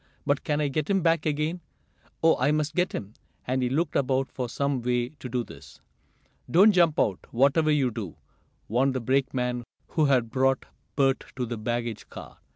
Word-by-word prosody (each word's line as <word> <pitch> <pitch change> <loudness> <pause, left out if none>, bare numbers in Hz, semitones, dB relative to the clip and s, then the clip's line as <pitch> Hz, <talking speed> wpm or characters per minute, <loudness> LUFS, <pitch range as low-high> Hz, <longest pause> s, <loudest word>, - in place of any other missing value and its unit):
"But 140 0 +1
can 150 -1 0
I 150 - +1
get 150 +6 -2
him 195 -3 +2
back 165 -2 +2
again? 155 +4 -1 0.6
Oh, 165 - +6
I 130 +3 +3
must 155 0 0
get 180 +1 +1
him!" 100 +1 -6 0.3
and 130 +1 0
he 125 - +1
looked 150 +4 -1
about 135 0 +1
for 125 -2 -4
some 140 +1 -1
way 120 0 0
to 135 -3 -10
do 125 0 -1
this. - - -14 0.7
"Don't 195 +6 +6
jump 170 -5 +3
out, 95 -4 0
whatever 140 +6 +3
you 140 -5 +2
do!" 105 -7 -6 0.5
warned 130 +4 +1
the - - 0
brakeman 125 -1 0 0.3
who 155 - +2
had 125 -5 +2
brought 135 0 +1 0.3
Bert 135 -1 +2
to 125 -1 -2
the 120 0 -4
baggage 120 -1 -3
car. - - -11
135 Hz, 185 wpm, -26 LUFS, 125-150 Hz, 0.7 s, Oh